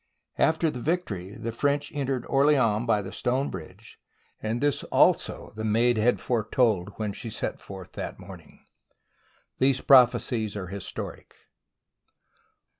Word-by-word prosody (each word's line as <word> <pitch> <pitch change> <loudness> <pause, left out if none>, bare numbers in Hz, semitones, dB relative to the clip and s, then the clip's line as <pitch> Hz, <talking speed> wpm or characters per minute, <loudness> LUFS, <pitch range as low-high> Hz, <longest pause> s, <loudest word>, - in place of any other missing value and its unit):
" - - -44
After 160 0 0
the 125 - -6
victory 115 - -3
the 115 - -4
French 145 +4 0
entered 135 -3 -2
Orleans 130 -6 +3
by 105 -3 +2
the 95 - -7
stone 130 +3 -1
bridge; 95 +5 -10 0.4
and 110 +2 -2
this 145 0 0
also - - +2
the 110 - -5
Maid 115 +2 +2
had 120 +3 +3
foretold 110 -4 +1
when 105 -2 -2
she 115 - -6
set - - -4
forth 95 -2 -9
that - - -6
morning. - - -13 0.9
These 130 0 +3
prophecies 120 -4 +4
are 95 -4 -5
historic. 100 0 -7
115 Hz, 135 wpm, -26 LUFS, 105-135 Hz, 0.9 s, prophecies